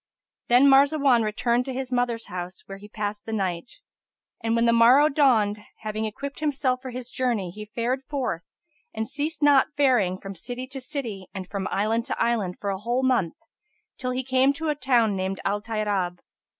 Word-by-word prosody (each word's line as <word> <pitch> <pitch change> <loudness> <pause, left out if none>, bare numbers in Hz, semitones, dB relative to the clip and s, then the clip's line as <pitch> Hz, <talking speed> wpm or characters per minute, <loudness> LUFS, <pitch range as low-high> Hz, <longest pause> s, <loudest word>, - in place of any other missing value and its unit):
Then 250 +3 +6
Marzawan 275 -2 +5
returned 235 +3 +1
to 265 - -4
his 260 0 -4
mother's 245 -2 0
house, 180 0 -7
where 195 0 -9
he 205 +1 -13
passed 210 -1 -5
the - - -4
night. 190 -1 -2 0.7
And 225 0 +1
when 230 0 +3
the 235 - +4
morrow 250 +6 +6
dawned, 230 -8 +3 0.2
having 215 0 -3
equipped 275 +6 -6
himself 270 -4 0
for 260 - -7
his 250 0 -6
journey, 230 -8 -1
he 210 +3 -8
fared 245 +3 0
forth 260 - -2 0.5
and 220 0 -2
ceased 295 +2 -2
not 285 -2 +6
faring 240 -10 +3
from 195 0 -7
city 245 +8 -6
to 270 -1 -6
city 240 -9 -5
and 190 -2 -5
from 195 0 -3
island 225 +3 0
to - - -4
island 215 -7 0
for 200 -1 -2
a 190 - -4
whole 240 +5 -1
month, 240 -11 +1 0.6
till 255 - -2
he 255 +1 -2
came 260 +2 +3
to 320 +2 -3
a 300 - +1
town 240 -7 +2
named 190 0 -2
Al 205 +1 0
Tayrab. 205 -5 -1
235 Hz, 190 wpm, -25 LUFS, 205-260 Hz, 0.7 s, Then